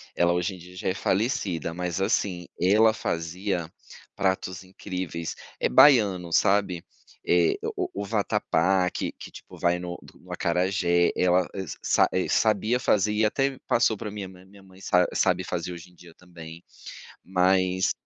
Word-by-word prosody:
Ela, 85 0 +3
hoje 90 +2 -1
em - - -12
dia, 90 +1 -14
já 90 - -3
é - - 0
falecida, 95 - -1
mas, 90 +1 -3
assim, 90 -2 -1
ela 110 +5 +4
fazia 85 -2 -3 0.4
pratos 95 0 -1
incríveis. 90 -3 -6 0.2
É - - +1
baiano, 95 - +5
sabe? 95 -3 +2 0.4
É 85 -2 +3 0.2
o - - -1
o 100 - -4
o - - -5
vatapá, 95 -3 +1
que - - -4
que - - -11
tipo - - -13
vai 85 0 +1
no 90 0 -6 0.2
no - - -15
acarajé, 90 -1 +1
ela, 90 0 +2
eh, - - -6
s 95 - -7
sa - - +3
eh, 95 - 0
sabia 110 +3 +1
fazer 105 -4 +2
e 105 +1 +1
até 135 +4 0
passou 115 -2 +2
pra 105 0 -6
minha 100 -2 -6
mãe. 90 0 -15
Minha 100 +1 -18
mãe 95 0 -18
sa 90 -1 +3
sabe 95 -1 +1
fazer 90 -1 -4
hoje 85 +1 -11
em - - -24
dia 85 -1 -16
também, 85 -1 -12 0.6
mas 95 0 +2
95 Hz, 170 wpm, -26 LUFS, 90-100 Hz, 0.6 s, baiano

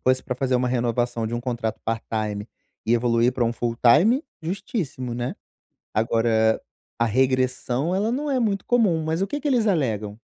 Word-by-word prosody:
fosse 130 0 +2
para 125 - -3
fazer 130 0 0
uma 125 0 +2
renovação 120 -1 0
de 120 +1 -2
contrato 120 -3 -3
part 115 0 -2
time 105 -1 -2 0.4
e 115 - +4
evoluir 120 +1 +2
para 120 -2 +1
full 120 0 -2
time, 175 - +5 0.2
justíssimo, 160 - -4
né. 120 +1 -3 0.6
Agora 110 0 +2 0.4
a 115 - +3
regressão 130 - +1
ela 210 +4 +1
não 290 +4 -2
é 265 -2 +1
muito 205 -5 0
comum, 210 -10 +3
mas 160 +3 -1
o 195 - +1
que 290 - -3
que 295 - -3
eles 245 -5 +2
alegam? 110 - 0
125 Hz, 175 wpm, -24 LUFS, 115-170 Hz, 0.6 s, time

